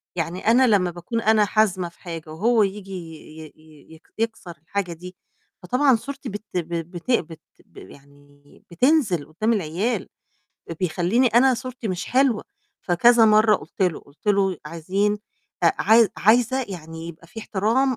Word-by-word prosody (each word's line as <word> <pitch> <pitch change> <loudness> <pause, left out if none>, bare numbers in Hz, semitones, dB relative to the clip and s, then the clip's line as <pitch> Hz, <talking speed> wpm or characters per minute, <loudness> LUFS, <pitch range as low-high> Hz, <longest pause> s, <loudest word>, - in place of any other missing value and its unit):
يعني 170 +3 -4
أنا 255 +2 +5
لمّا 190 -5 +2
باكون 175 +7 -4
أنا 215 -1 +4
حازمة 195 -5 +1
في 170 - -27
حاجة 165 -3 -8
وهو 220 +7 +2
ييجي 195 0 -4
ي 160 -3 -9
ي 155 - -12
ي 155 0 -19
يك 160 - -22
يكسَر 220 -6 -4
الحاجة 180 0 -3
دي، 180 +2 -11 0.5
فطبعًا 255 +7 +3
صورتي 275 +4 -6
بت 205 +2 -7
ب - - +2 0.2
ب 165 0 -4
بت 175 +7 -5
بت 165 -9 -1 0.3
ب - - -24
يعني 145 0 -17
بتنزِل 210 - +2
قدّام 215 +9 0
العيال، 200 +3 -2 0.7
بيخلّيني 185 +8 +1
أنا 250 +3 +4
صورتي 250 -1 -6
مش 185 -1 -3
حلوة، 255 -4 +2 0.4
فكذا 230 +6 +5
مَرّة 215 0 +5
قُلت - - -6
له، 180 -4 0
قُلت 140 +8 -24
له 200 -2 +2
ي 175 - -10
"عايزين 190 +6 -1 0.5
أ - - +5
عايز 225 0 +5
عايزة 245 +5 +3
يعني 165 -3 -8
يبقى 170 0 -12
في 225 +6 -9
احترام 230 +6 0
195 Hz, 165 wpm, -23 LUFS, 170-225 Hz, 0.7 s, أنا